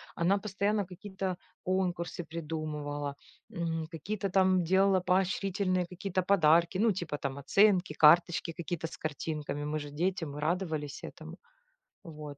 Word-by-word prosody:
Она 190 Hz, +4 st, +2 dB
постоянно 205 Hz, 0 st, 0 dB
какие-то 190 Hz, 0 st, -5 dB, 0.3 s
конкурсы 180 Hz, -2 st, -1 dB
придумывала, 150 Hz, -3 st, -4 dB, 0.4 s
м, 165 Hz, -1 st, -2 dB
какие-то 195 Hz, +5 st, -3 dB
там 185 Hz, -1 st, +3 dB
делала 190 Hz, +2 st, +4 dB
поощрительные 185 Hz, 0 st, +1 dB
какие-то 185 Hz, +1 st, -3 dB
подарки: 170 Hz, -1 st, +4 dB
ну, 220 Hz, +3 st, +4 dB
типа 175 Hz, -6 st, -3 dB
там 140 Hz, -1 st, -4 dB
оценки, 185 Hz, +3 st, +3 dB
карточки 165 Hz, +2 st, +5 dB
какие-то 170 Hz, 0 st, -4 dB
с -, -, -10 dB
картинками. 150 Hz, -1 st, -4 dB
Мы 150 Hz, +1 st, -2 dB
же 145 Hz, -1 st, -7 dB
дети, 175 Hz, +3 st, -1 dB
мы 145 Hz, -1 st, -7 dB
радовались 155 Hz, -3 st, -2 dB
этому. -, -, -9 dB, 0.7 s
Вот. 150 Hz, -4 st, -9 dB
175 Hz, 130 wpm, -31 LUFS, 155-190 Hz, 0.7 s, карточки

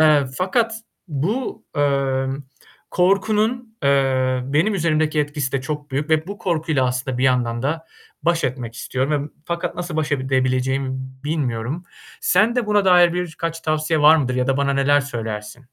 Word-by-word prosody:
eee, 155 Hz, -2 st, +5 dB
fakat 225 Hz, +5 st, +1 dB, 0.3 s
bu, 210 Hz, -, -2 dB
emm, 135 Hz, -1 st, 0 dB, 0.5 s
korkunun, 215 Hz, +5 st, +1 dB
eee, 130 Hz, -2 st, +2 dB
benim 155 Hz, +11 st, +1 dB
üzerimdeki 155 Hz, -3 st, +1 dB
etkisi 145 Hz, -2 st, -2 dB
de 135 Hz, -, 0 dB
çok 150 Hz, +1 st, -5 dB
büyük 145 Hz, +4 st, -2 dB
ve 160 Hz, 0 st, +2 dB
bu 200 Hz, +1 st, -7 dB
korkuyla 160 Hz, -6 st, 0 dB
aslında 125 Hz, 0 st, -2 dB
bir 130 Hz, -, +1 dB
yandan 120 Hz, -2 st, +1 dB
da 160 Hz, +4 st, -2 dB, 0.4 s
baş 170 Hz, -1 st, +1 dB
etmek 125 Hz, -3 st, -3 dB
istiyorum 140 Hz, +5 st, -1 dB
ve 150 Hz, -, -8 dB, 0.2 s
fakat 170 Hz, 0 st, -2 dB
nasıl 175 Hz, -2 st, -4 dB
baş 155 Hz, -2 st, -1 dB
edebileceğimi 130 Hz, 0 st, 0 dB, 0.4 s
bilmiyorum. 145 Hz, 0 st, -2 dB, 0.4 s
Sende 230 Hz, +5 st, +3 dB
buna 210 Hz, -1 st, +3 dB
dair 175 Hz, -2 st, +6 dB
birkaç 165 Hz, -2 st, -3 dB
tavsiye 155 Hz, 0 st, 0 dB
var 150 Hz, +2 st, +8 dB
mıdır 130 Hz, -5 st, 0 dB
ya 125 Hz, 0 st, 0 dB
da 135 Hz, 0 st, +1 dB
bana 140 Hz, 0 st, +1 dB
neler 140 Hz, +1 st, +4 dB
söylersin? 110 Hz, -5 st, -5 dB
150 Hz, 155 wpm, -21 LUFS, 130-170 Hz, 0.5 s, var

